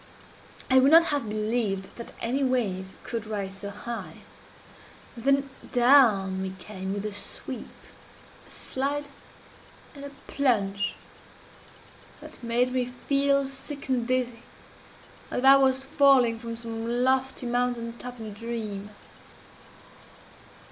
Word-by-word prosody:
I 260 - +7
would 265 +2 +5
not 330 +2 +8
have 275 -7 -1
believed 215 -2 -1
that 235 - -8
any 260 +4 0
wave 215 -8 0 0.2
could 225 -2 -4
rise 195 -2 -4
so 200 - -5
high. 235 +3 -7 0.9
And 235 0 -10
then 275 0 +3 0.2
down 230 -7 +5
we 190 0 -4
came 190 -2 -6
with 205 +1 -4
a 210 - -3
sweep, 205 - -5 0.8
a - - -19
slide, 285 +2 -3 0.8
and 280 -2 -10
a 280 - -6 0.2
plunge, 205 -7 0 1.2
that - - -13
made 240 +2 +1
me 255 -1 +1
feel 275 +2 +1
sick 275 +1 -9
and 245 -3 +1
dizzy, 250 -2 -1 0.9
as - - -3
if 250 - 0
I 270 +1 +9
was 265 -1 +3
falling 265 -5 +4
from 230 -1 -6
some 230 +1 -2
lofty 265 0 +1
mountain 240 -1 -1
top 250 -1 -8
in 220 - -6
a 215 - -6
dream. 210 -2 -5
240 Hz, 130 wpm, -27 LUFS, 215-265 Hz, 1.2 s, I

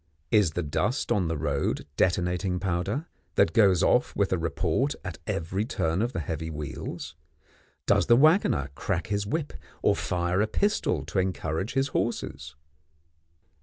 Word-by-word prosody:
Is 105 -8 +4
the 90 - -1
dust 105 - -1
on 95 -5 +2
the 80 -1 -1
road 70 -1 -1
detonating 90 +1 +1
powder, 95 - -1 0.3
that 80 - +3
goes 95 -6 +5
off - - +2
with 100 -2 +1
a - - +2
report 85 - 0
at 90 -4 -6
every 90 +5 -1
turn 85 -5 -1
of 120 +2 0
the 85 - -3
heavy 80 +1 -4
wheels? 75 -2 -6 0.7
Does - - +3
the 120 - +7
waggoner 145 - +4
crack - - -2
his 100 -1 -1
whip 150 +6 -2 0.3
or - - +4
fire 90 +2 0
a 110 - +2
pistol 110 - 0
to 80 +5 -1
encourage 95 +1 -2
his 135 +1 +1
horses? 75 - -3
90 Hz, 155 wpm, -27 LUFS, 80-110 Hz, 0.7 s, the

